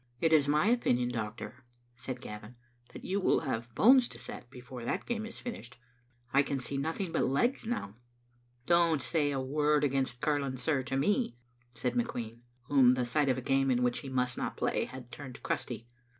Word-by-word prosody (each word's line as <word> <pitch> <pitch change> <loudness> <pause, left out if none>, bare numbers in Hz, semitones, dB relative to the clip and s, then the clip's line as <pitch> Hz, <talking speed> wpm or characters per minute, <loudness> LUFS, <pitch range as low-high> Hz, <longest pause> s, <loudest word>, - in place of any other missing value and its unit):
It 160 +3 +3
is 145 -3 +5
my 150 +4 +3
opinion, 125 - +2
doctor," 115 +2 -5 0.3
said 125 0 -6
Gavin, 105 0 -9 0.2
" 120 0 -29
that - - -10
you 195 +2 0
will 190 - +3
have 120 -5 -4
bones 255 +2 +6
to - - -11
set 120 - -8
before 125 -1 -9
that - - -2
game 225 -2 -2
is 230 - -9
finished. 230 - -7 0.6
I 140 - +6
can 140 0 -2
see 135 +1 -4
nothing 160 +6 -2
but - - +1
legs 225 - +1
now." 110 - -3 0.3
" 120 0 -38
Don't 170 -3 +3
say 150 0 0
a 140 -2 -1
word 150 +2 +2
against 135 -3 0
curling, 145 -3 0
sir, 135 +2 +1
to 130 +1 -2
me," 205 - +1 0.4
said 125 -1 -1
McQueen, 120 -1 -3 0.2
whom 130 -1 +5
the 125 -1 0
sight 140 +4 +1
of 130 - +2
a - - -3
game 135 +1 +2
in 125 -1 +2
which 125 0 +1
he 135 - -7
must 125 -1 -1
not - - -3
play - - 0
had 125 -2 -10
turned 130 -4 -9
crusty. 120 -1 -3
130 Hz, 200 wpm, -31 LUFS, 120-150 Hz, 0.6 s, bones